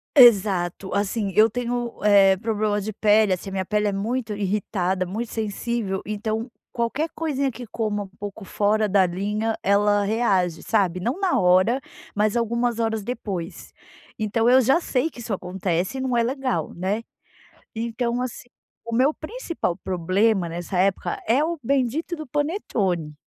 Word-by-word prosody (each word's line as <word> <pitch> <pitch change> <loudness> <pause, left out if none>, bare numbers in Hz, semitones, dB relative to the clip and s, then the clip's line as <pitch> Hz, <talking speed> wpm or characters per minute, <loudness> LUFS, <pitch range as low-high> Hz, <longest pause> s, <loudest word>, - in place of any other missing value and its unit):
Exato, 195 - +5
assim 200 0 -1
eu 220 +1 +6
tenho, 240 0 -2
eh, 195 -2 +6
problemas 210 0 -1
de 215 - -3
pele, 210 -1 +4
assim, 185 +2 -5
a - - -9
minha 190 -1 -2
pele 210 +2 +1
é - - +1
muito 220 +3 -2
irritada, 190 -2 -1
muito 220 +6 -4
sensível, 215 -2 -2
então 220 +3 -3 0.2
qualquer 250 +7 -1
coisinha 280 -4 -1
que 245 0 -9
coma 215 -2 -2
um - - -10
pouco 205 +1 -7
fora 210 +2 +1
da 195 -1 +4
linha, 210 +5 -1
ela 205 +1 +3
reage, 200 -6 +1
sabe, 190 -5 +1
não 245 - -2
na 380 -3 +2
hora 185 +7 +4 0.4
mas 210 +2 +1
algumas 235 0 0
horas 220 -2 0
depois. 195 -7 -5 0.5
Então, 225 +2 +1
eu 255 - +7
já 265 +7 +4
sei 275 0 0
que 245 - -13
isso 235 -1 -6
acontece 185 +4 -2
e - - -2
não 255 -2 0
é 235 - +3
legal, 260 +1 -2
né. 195 +6 -2 0.7
Então, 235 +1 -2
assim, 250 -1 -6 0.3
o 230 - -7
meu 270 +6 +4
principal 330 - -4
problema 185 +2 +1
nessa 175 +2 -4
época 190 +1 0
é 255 +6 +3
o 335 0 -2
bendito 275 +7 0
do 310 -1 -7
panetone. 225 - -1
215 Hz, 160 wpm, -24 LUFS, 195-240 Hz, 0.7 s, eu